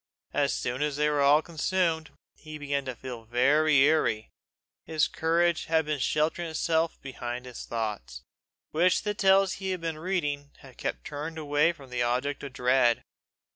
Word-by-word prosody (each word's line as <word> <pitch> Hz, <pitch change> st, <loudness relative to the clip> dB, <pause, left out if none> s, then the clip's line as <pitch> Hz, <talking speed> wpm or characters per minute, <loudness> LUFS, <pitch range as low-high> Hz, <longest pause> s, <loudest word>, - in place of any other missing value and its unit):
As -, -, +2 dB
soon 125 Hz, +3 st, -3 dB
as 150 Hz, -1 st, 0 dB
they 150 Hz, +1 st, +2 dB
were 145 Hz, -1 st, +1 dB
all 145 Hz, +3 st, +5 dB
consumed, 165 Hz, -1 st, 0 dB, 0.2 s
he 155 Hz, -1 st, -10 dB
began 140 Hz, -1 st, -2 dB
to 130 Hz, -2 st, -4 dB
feel 125 Hz, -2 st, -8 dB
very 140 Hz, +6 st, +3 dB
eerie: 120 Hz, -8 st, +2 dB, 0.5 s
his 155 Hz, -1 st, +1 dB
courage 170 Hz, +1 st, +1 dB
had 160 Hz, -1 st, +2 dB
been 150 Hz, -1 st, -2 dB
sheltering 160 Hz, +5 st, 0 dB
itself 160 Hz, +1 st, 0 dB
behind 125 Hz, -2 st, -5 dB
his 125 Hz, -2 st, -8 dB
thoughts, 105 Hz, -, -4 dB, 0.5 s
which 175 Hz, +4 st, +3 dB
the 210 Hz, -1 st, -1 dB
tales 195 Hz, -1 st, +4 dB
he 190 Hz, -, -2 dB
had 185 Hz, -2 st, -2 dB
been 165 Hz, -2 st, -3 dB
reading 150 Hz, -5 st, -2 dB
had -, -, -15 dB
kept -, -, -4 dB
turned 155 Hz, +3 st, -5 dB
away 150 Hz, +1 st, +2 dB
from 135 Hz, -6 st, -14 dB
the 125 Hz, -1 st, -1 dB
object 125 Hz, +4 st, 0 dB
of 140 Hz, -, -7 dB
dread. 125 Hz, -1 st, +2 dB
150 Hz, 170 wpm, -28 LUFS, 125-160 Hz, 0.5 s, all